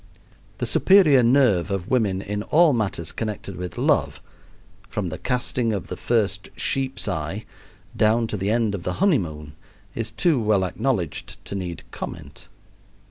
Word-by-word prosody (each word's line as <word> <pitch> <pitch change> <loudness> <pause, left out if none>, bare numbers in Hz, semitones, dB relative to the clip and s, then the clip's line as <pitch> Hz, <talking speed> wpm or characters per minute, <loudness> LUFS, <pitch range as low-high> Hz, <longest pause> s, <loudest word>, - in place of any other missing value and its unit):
The - - -2
superior 180 -9 +5
nerve 120 -7 +3
of 95 -3 -3
women 100 -7 +1
in 105 +1 -3
all 155 +6 +4
matters 100 -8 -1
connected 105 -3 -5
with 90 -1 -6
love, - - +1 0.7
from 100 -4 -3
the 80 - -6
casting 125 -2 0
of 100 - -4
the - - -4
first 100 -5 0
sheep's 135 -3 0
eye 90 +3 -3 0.5
down 110 +2 +3
to 110 - -3
the 100 0 -2
end 110 -2 +1
of 100 - -4
the - - -3
honeymoon, 80 - 0 0.4
is 115 -1 -3
too 160 - +1
well 105 -3 +2
acknowledged 95 - -2
to - - -6
need 90 -3 -5
comment. - - -8
105 Hz, 150 wpm, -23 LUFS, 95-125 Hz, 0.7 s, superior